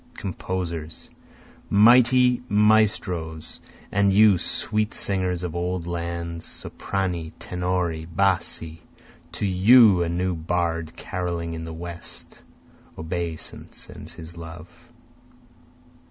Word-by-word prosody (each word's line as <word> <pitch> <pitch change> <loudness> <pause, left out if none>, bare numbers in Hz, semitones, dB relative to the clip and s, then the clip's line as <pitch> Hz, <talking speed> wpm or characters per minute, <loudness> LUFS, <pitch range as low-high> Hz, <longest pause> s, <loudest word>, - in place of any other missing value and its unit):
Composers! 85 -4 -5 0.6
mighty 125 +3 +5
maestros! 100 -7 +1 0.3
And 100 0 +3
you, 100 -2 +6
sweet 110 +4 -2
singers 90 -2 -1
of 85 -2 -4
old 90 0 -2
lands, 85 -1 -4
soprani, 90 -4 -4
tenori, 90 -3 -2
bassi! 85 -3 -1 0.5
To - - -2
you 100 +1 +6
a 85 - 0
new 90 +2 -1
bard 85 0 -2
caroling 85 -3 -3
in 80 0 -5
the 80 - -6
West, 85 +1 -9 0.6
Obeisant 85 0 -5
sends - - -9
his 85 0 -11
love. 80 -1 -9
90 Hz, 95 wpm, -24 LUFS, 85-100 Hz, 0.6 s, you